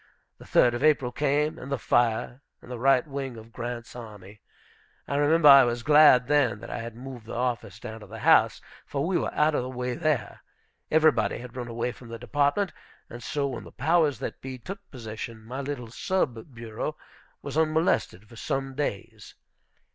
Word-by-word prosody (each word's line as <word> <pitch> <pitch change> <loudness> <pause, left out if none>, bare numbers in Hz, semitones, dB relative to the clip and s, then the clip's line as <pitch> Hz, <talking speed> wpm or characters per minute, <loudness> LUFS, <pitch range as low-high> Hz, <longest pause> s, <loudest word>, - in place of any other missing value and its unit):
The - - -13
third 120 - +4
of 120 +3 -3
April 145 -5 +3
came, 145 +3 0
and 135 - -8
the 140 - 0
fire, 120 +2 +1 0.2
and - - -13
the 125 - -5
right 135 0 +4
wing 135 -4 -5
of 115 +1 -13
Grant's 120 -1 -6
army. 105 -4 -11 0.7
I 140 - -2
remember 150 +2 +4
I 140 -1 +10
was 120 -1 -1
glad 145 -4 +7
then 145 -7 +2
that - - -8
I - - -4
had 115 -1 -7
moved 125 -2 -9
the - - -6
office 120 -5 -2
down 110 -2 -8
to 105 - -12
the - - -9
house, - - +5 0.2
for 140 0 -3
we 180 0 +1
were - - -2
out 150 +1 +2
of - - +1
the 125 - -5
way 125 -1 -3
there. 155 - -1 0.5
Everybody 155 -1 +3
had 125 0 -10
run 125 -2 -5
away 120 +1 -2
from 120 - -14
the 115 - -6
Department; 145 - 0 0.4
and 120 - -8
so, 140 +4 -2
when 130 -4 -4
the - - -12
powers 160 -2 +2
that - - -6
be 130 -1 -6
took 195 - -8
possession, 110 -2 -8
my 130 +4 -5
little 130 -5 -5
sub 130 - -2
bureau 115 -3 -5 0.5
was - - -6
unmolested 155 - +1
for 115 - -15
some 135 +3 -3
days. 130 -8 -5
125 Hz, 195 wpm, -27 LUFS, 120-145 Hz, 0.7 s, I